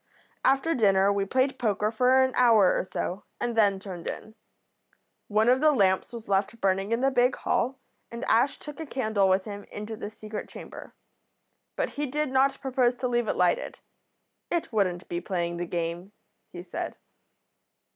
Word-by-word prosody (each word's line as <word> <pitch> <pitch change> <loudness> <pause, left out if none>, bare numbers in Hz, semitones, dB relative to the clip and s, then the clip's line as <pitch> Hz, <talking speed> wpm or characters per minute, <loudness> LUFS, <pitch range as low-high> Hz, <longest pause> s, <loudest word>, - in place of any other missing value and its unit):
"After 275 +5 +3
dinner 200 -5 +3
we 200 -1 0
played 260 +5 0
poker 210 -2 0
for 255 +3 +4
an 260 0 0
hour 225 -6 +5
or - - 0
so 185 +3 -3 0.2
and 240 -1 -2
then 200 -3 +3
turned 185 -3 -6
in. 220 - -8 0.9
One 215 +2 +2
of 255 +2 +4
the 310 0 +6
lamps 195 -8 +2
was 230 -2 -9
left 200 +4 0
burning 195 +1 0
in 230 +1 +1
the 270 +1 +3
big 250 0 +3
hall, 260 +2 -1 0.3
and 235 +3 -6
Ash 250 +5 +2
took 295 -1 -10
a 320 - -5
candle 215 -8 +1
with 190 0 +2
him 205 -1 -7
into 210 +2 -7
the 210 - -6
secret 215 0 -7
chamber. - - -11 0.8
But - - -1
he 290 0 -3
did 300 +1 -2
not 270 +1 +2
propose 255 -2 +1
to 250 0 -2
leave 240 -2 0
it - - 0
lighted. 180 -1 +1 0.7
It 340 -8 -2
wouldn't 185 -4 0
be 175 0 -3
playing 170 -2 -2
the 175 0 -3
game, 170 +3 -4 0.4
he - - -8
said. - - -5
220 Hz, 175 wpm, -27 LUFS, 195-260 Hz, 0.9 s, the